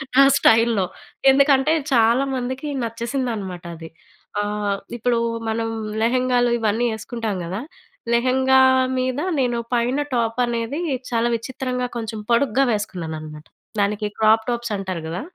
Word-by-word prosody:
నా 275 - +8
స్టైల్‌లో. 225 -4 +4 0.5
ఎందుకంటే 280 +2 +4 0.2
చాలామందికి 255 +3 +1 0.2
నచ్చేసింది 235 +3 -2
అన్నమాట 185 -4 -6
అది. 160 0 -10 0.5
ఆహ్, 205 -1 -1 0.2
ఇప్పుడు 240 0 +1 0.3
మనం 225 0 -1 0.3
లెహంగాలు 245 0 +2
ఇవన్నీ 225 +2 +1
వేసుకుంటాం 220 -1 -4
కదా! 190 +6 -4 0.5
లెహంగా 260 +2 +4 0.4
మీద 255 +2 -1 0.2
నేను 240 -2 +1 0.2
పైన 245 +4 +1
టాప్ 230 +1 0
అనేది 235 +5 -2 0.3
చాలా 230 0 +1
విచిత్రంగా 250 +1 -3
కొంచెం 220 -1 -4
పొడుగ్గా 265 +2 +3
వేసుకున్నానన్నమాట. 160 -7 -5 0.4
దానికి 210 +1 0
క్రాప్‌టాప్స్ 225 +2 +2
అంటారు 185 -4 -4
కదా! 175 +8 -4
235 Hz, 115 wpm, -22 LUFS, 210-255 Hz, 0.5 s, నా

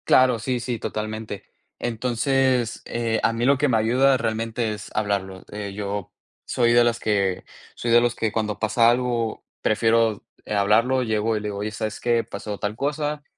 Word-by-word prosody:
Claro, 130 -2 +5
sí, 125 +2 -1
sí, 120 -1 -3
totalmente. 110 -1 -5 0.4
Entonces, 120 +1 0
eh, 115 -1 -1
a 115 - +3
mí 115 +1 -1
lo 140 +1 +4
que 145 - +3
me 120 -4 +3
ayuda 130 +5 +3
realmente 115 0 -2
es 105 0 -8
hablarlo. 100 -3 -2
Eh, 105 -1 -5
yo 100 -2 -4 0.3
soy 120 -1 +2
de 120 0 +6
las 120 0 +1
que 100 -3 0 0.3
soy 120 - -2
de 120 0 +7
los 120 0 +1
que 110 -1 -1
cuando 105 -1 -2
pasa 115 +2 +4
algo 120 -2 -1 0.2
prefiero, 110 0 +2 0.2
eh, - - -4
hablarlo, 115 +6 +3
llego 110 -1 0
y - - -1
le 105 - -5
digo: 100 - -5
"Oye, 105 +1 -3
¿sabes 110 0 -4
qué? 120 -1 +1
Pasó 105 -2 -6
tal 105 +1 -3
cosa, 145 +3 -2
115 Hz, 185 wpm, -23 LUFS, 105-120 Hz, 0.4 s, de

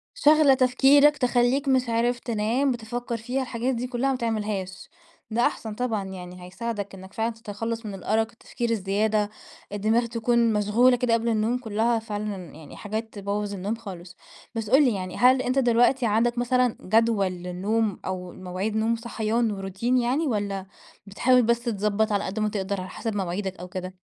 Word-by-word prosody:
شاغلة 305 - +5
تفكيرك، 270 +3 +5
تخلّيك 250 +2 +2
مش 255 -2 +2
عارف 235 +2 +1
تنام، 235 +5 0
بتفكّر 240 +1 -4
فيها، 250 +4 -2
الحاجات 250 +1 -2
دي 240 +2 -3
كُلّها 255 +2 -1
ما - - -1
تعملهاش، 210 -5 -3 0.4
ده 235 +2 +2
أحسن 220 -2 -3
طبعًا 225 -4 -1
يعني 180 -1 -9
هيساعدك 205 +1 -5
إنّك 190 0 -11
فعلًا 225 +1 -1
تتخلّص 225 +1 -5
من 205 - -5
الأرَق، 220 +3 0
التفكير 235 +1 -4
الزيادة، 210 0 +1 0.4
الدماغ 220 +4 +1
تكون 235 0 +1
مشغولة 215 +5 +4
كده 240 -1 +1
قبل 230 0 0
النوم 225 +2 +1
كُلهّا 225 0 0
فعلًا 210 -2 -4 0.2
يعني 155 -1 -12
حاجات 220 +2 -5
تبوّظ 205 0 -3
النوم 200 +3 -2
خالص. 185 -5 -10 0.4
بس 225 -2 -4
قُل 270 +4 +6
لي 245 -5 +2
يعني، 185 -2 -5
هل 255 +1 +5
أنت 255 +2 0
دلوقتي 245 0 +3
عندك 235 +3 +1
مثلًا 250 -1 +2
جدول 220 0 +2
للنوم 185 +4 -1
أو 180 -1 -4
مواعيد 185 +4 -4
نوم 220 +1 +2
وصحيان 230 0 -1
وروتين 200 +6 -1
يعني 255 +6 +1
والّا 200 -5 -2 0.4
بتحاول 250 +5 +3
بس 235 +1 +2
تضبّط 215 -1 0
على 205 0 0
قد 195 +3 -4
ما 215 - +1
تقدر 200 -1 -2
على 185 - -7
حسب 225 -3 -4
مواعيدك 190 0 -3
أو 180 - -7
كده؟ 185 0 -6
225 Hz, 170 wpm, -25 LUFS, 200-240 Hz, 0.4 s, قُل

